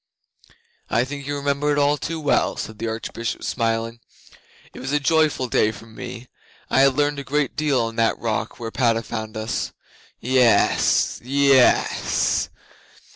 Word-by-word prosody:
'I 120 - +2
think 140 +1 -7
you 145 - -2
remember 140 +1 0
it 145 - +1
all 145 0 +3
too 165 +2 -4
well,' 145 -2 +1
said 110 -1 -6
the 115 - -3
Archbishop, 115 +1 -4
smiling. 115 0 -1 0.7
'It - - -10
was 130 +1 -4
a 150 - +2
joyful 150 -3 +2
day 110 -2 +2
for 110 +1 -12
me. 120 +2 -9 0.4
I - - +3
had 135 -1 +4
learned 145 0 +1
a - - -5
great 145 0 -1
deal 150 -4 +1
on 115 0 -4
that 115 0 +2
rock 115 0 -3
where 115 -1 -5
Padda 115 -2 +1
found 110 0 -6
us. 110 +1 -3 0.5
Yes 125 -1 +3
yess! 135 0 +3
130 Hz, 155 wpm, -22 LUFS, 115-145 Hz, 0.7 s, had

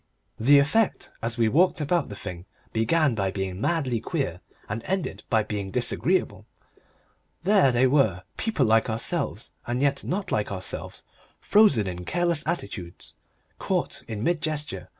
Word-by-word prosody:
The 140 +6 +6
effect 170 +10 +2
as 115 0 -3
we 115 -1 +3
walked 170 +11 +3
about 165 +4 0
the 105 - -7
thing 90 -2 -8 0.3
began 140 +6 +2
by 100 -3 0
being 95 0 -4
madly 135 -8 0
queer, - - -3 0.3
and 110 +3 -4
ended 180 - -2
by 110 -1 +3
being 105 -2 -4
disagreeable. - - 0 1.0
There 190 -8 +5
they 125 +1 +3
were, 125 -10 +2
people 220 - 0
like 110 0 +3
ourselves 110 +1 -2 0.2
and 120 +1 -1
yet 140 0 +1
not 190 +2 -3
like 105 -1 0
ourselves, 95 -1 -5 0.4
frozen 205 - +4
in 90 -1 -5
careless 170 - 0
attitudes, 100 - -5 0.5
caught - - -1
in 110 -1 -4
mid 170 +1 +1
gesture. 150 -2 -4
120 Hz, 150 wpm, -26 LUFS, 105-160 Hz, 1.0 s, The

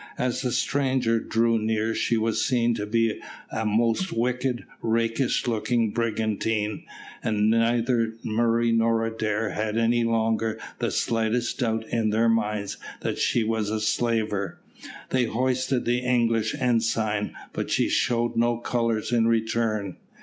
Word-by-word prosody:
As 125 -1 -1
the 125 -2 -1
stranger 125 -1 +1
drew 115 0 +1
near 110 +1 0
she 115 - +1
was 110 0 0
seen 120 -3 +2
to 105 -2 -3
be 115 0 +1 0.3
a 110 0 -1
most 115 - +1
wicked, 125 +1 -1 0.2
rakish 115 +2 0
looking 115 -1 0
brigantine, 110 -1 -1 0.4
and 105 0 +2
neither 115 0 +1
Murray 115 +1 +1
nor 115 0 +2
Adair 110 -1 -1
had 110 +1 -2
any 115 +1 +2
longer 115 -1 0 0.2
the - - 0
slightest 115 +1 0
doubt 110 -2 0
in 115 -2 +1
their 115 +2 +2
minds 105 -3 -1 0.2
that - - -2
she 120 - +2
was 110 -1 -1
a 110 0 -1
slaver. 110 -2 -1 0.5
They 130 -2 +2
hoisted 130 +2 0
the 120 +1 +2
English 115 -3 +1
ensign, 115 -4 0 0.2
but - - -3
she - - +2
showed 120 0 +1
no 120 0 +2
colours 115 -1 -1
in 115 -2 +3
return. 110 -4 0
115 Hz, 140 wpm, -25 LUFS, 110-120 Hz, 0.5 s, in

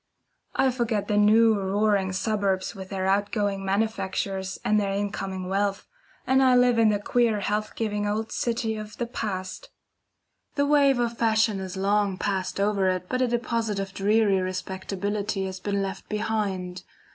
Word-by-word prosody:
I 265 - +3
forget 235 -4 -1
the 210 - 0
new 220 +2 +5
roaring 200 -1 +1
suburbs 195 -1 -1
with 190 -1 -9
their 190 -1 -2
out 200 +1 +1
going 205 -3 -1
manufactures 195 -2 -1
and 215 0 +3
their 200 -1 0
incoming 195 -2 -3
wealth, 195 +1 -1 0.4
and 265 +1 +3
I 255 -1 +5
live 245 -1 +4
in 225 -1 +5
the 210 - +2
queer 220 0 +1
health 210 +1 -1
giving 210 -2 -1
old 220 +2 -2
city 230 -2 -1
of 215 0 -8
the 240 - -1
past. 195 -6 -5 0.9
The 285 -1 +2
wave 285 -2 +4
of 235 -1 -1
fashion 220 -2 +2
has 190 0 -6
long 200 0 +1
passed 190 -1 -2
over 200 -2 +2
it, 185 -1 -2
but 255 - 0
a 255 - +3
deposit 230 -3 -1
of 195 -1 -4
dreary 205 0 +3
respectability 190 +2 -3
has 190 0 -5
been 200 +1 -1
left 190 0 -6
behind. 195 -4 -2
205 Hz, 165 wpm, -26 LUFS, 195-220 Hz, 0.9 s, new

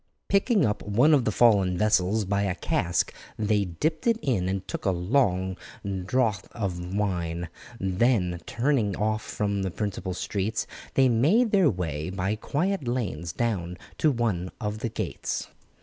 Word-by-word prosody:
Picking 200 +1 +3
up 105 -1 -1
one 120 +10 +4
of 135 -5 +4
the 110 - +2
fallen 100 -5 +4
vessels 105 0 +2
by 100 +1 0
a 95 -3 0
cask 90 -1 0 0.2
they 105 -1 +1
dipped 155 - -2
it 230 -1 +4
in 95 -9 +1
and 95 0 -3
took - - -4
a - - +2
long 95 -1 +1 0.5
draught 110 -6 +1
of 90 -4 -3
wine; 85 -4 -1 0.3
then, 95 -2 +1
turning 115 -5 +1
off 110 +1 0
from 100 -2 -2
the 95 - -1
principal 100 -1 -3
streets, 105 +4 -2 0.3
they 135 -1 +5
made 165 - +3
their 190 -6 +5
way 80 - -3
by 95 +2 -1
quiet 150 - -1
lanes 95 -10 -2
down 90 -5 -2 0.2
to 155 - +4
one 110 -9 0
of 105 -2 -3
the 115 - -2
gates. 110 - -3
105 Hz, 155 wpm, -26 LUFS, 90-120 Hz, 0.5 s, they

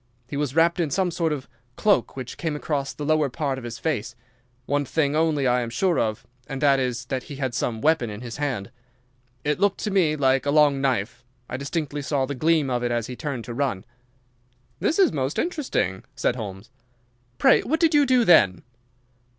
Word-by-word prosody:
He 140 - -6
was 145 -1 -2
wrapped 170 +2 +3
in 165 -3 +1
some 180 +4 0
sort 165 -1 0
of 145 -4 -4 0.3
cloak 205 -9 +1
which 130 -2 -6
came 160 -3 -2
across 145 -2 -2
the 150 - -6
lower 155 -1 +2
part 135 -1 -2
of - - -12
his 120 0 -6
face. 120 -3 -2 0.5
One 145 +2 0
thing 145 +1 0
only 155 -3 +2
I 125 0 +3
am 120 - -3
sure 175 +8 +1
of, 110 -2 -1 0.2
and 135 -2 -5
that 140 -1 +4
is 125 -2 -2
that 130 +1 -2
he 145 - -6
had 130 -3 -3
some 115 -1 -2
weapon 150 -7 +2
in 105 +1 -7
his 120 -2 -7
hand. 130 -8 -3 0.7
It 150 +2 0
looked 200 -1 +2
to 210 - -2
me 175 -6 +3
like 135 -1 +2
a - - +2
long 145 -2 +4
knife. 120 -3 -1 0.2
I - - -5
distinctly 145 +2 -3
saw 135 0 0
the 140 - -4
gleam 155 +1 +2
of 125 -2 -1
it 120 - 0
as 120 -2 0
he 125 - -7
turned 140 -4 -4
to 120 - -6
run." 120 -7 -2 0.9
"This 320 - +1
is 380 -5 +5
most 135 0 -2
interesting," 260 - -1
said 125 - 0
Holmes. 105 -1 -7 0.7
"Pray - - +5
what 320 +5 -1
did 330 -2 +3
you 290 -2 +5
do 250 -2 +4
then?" 110 - +5
140 Hz, 205 wpm, -24 LUFS, 125-160 Hz, 0.9 s, is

